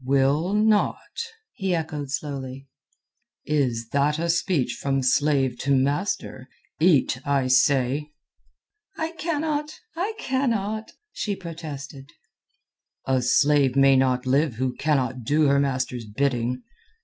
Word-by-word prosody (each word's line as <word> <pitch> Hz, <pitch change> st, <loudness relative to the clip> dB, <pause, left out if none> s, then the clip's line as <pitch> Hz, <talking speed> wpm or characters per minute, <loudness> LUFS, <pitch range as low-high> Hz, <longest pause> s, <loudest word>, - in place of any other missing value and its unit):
"Will 140 Hz, +7 st, +2 dB
not?" 215 Hz, -, +1 dB, 0.3 s
he 190 Hz, -2 st, -1 dB
echoed 150 Hz, -4 st, -4 dB
slowly. 135 Hz, -2 st, -5 dB, 0.8 s
"Is 125 Hz, -6 st, 0 dB
that 145 Hz, +3 st, +1 dB
a 170 Hz, +1 st, +1 dB
speech 165 Hz, -8 st, 0 dB
from 135 Hz, -1 st, 0 dB
slave 135 Hz, -1 st, +2 dB
to 140 Hz, 0 st, +2 dB
master? 135 Hz, -1 st, -1 dB, 0.3 s
Eat, 155 Hz, -6 st, +3 dB
I 140 Hz, -2 st, +1 dB
say." 130 Hz, +3 st, +2 dB, 0.9 s
"I 320 Hz, 0 st, -2 dB
cannot! 310 Hz, -2 st, -2 dB, 0.2 s
I 380 Hz, +6 st, -2 dB
cannot!" 225 Hz, -, -1 dB, 0.2 s
she 205 Hz, -2 st, -3 dB
protested. 150 Hz, -5 st, -8 dB, 0.9 s
"A 130 Hz, -1 st, +1 dB
slave 140 Hz, 0 st, +3 dB
may 135 Hz, 0 st, +6 dB
not 130 Hz, -1 st, +2 dB
live 135 Hz, 0 st, +2 dB
who 130 Hz, +2 st, -1 dB
cannot 130 Hz, -4 st, 0 dB
do 150 Hz, +6 st, +2 dB
her 140 Hz, 0 st, +4 dB
master's 130 Hz, -3 st, -1 dB
bidding." 125 Hz, +1 st, -1 dB
140 Hz, 115 wpm, -24 LUFS, 130-170 Hz, 0.9 s, may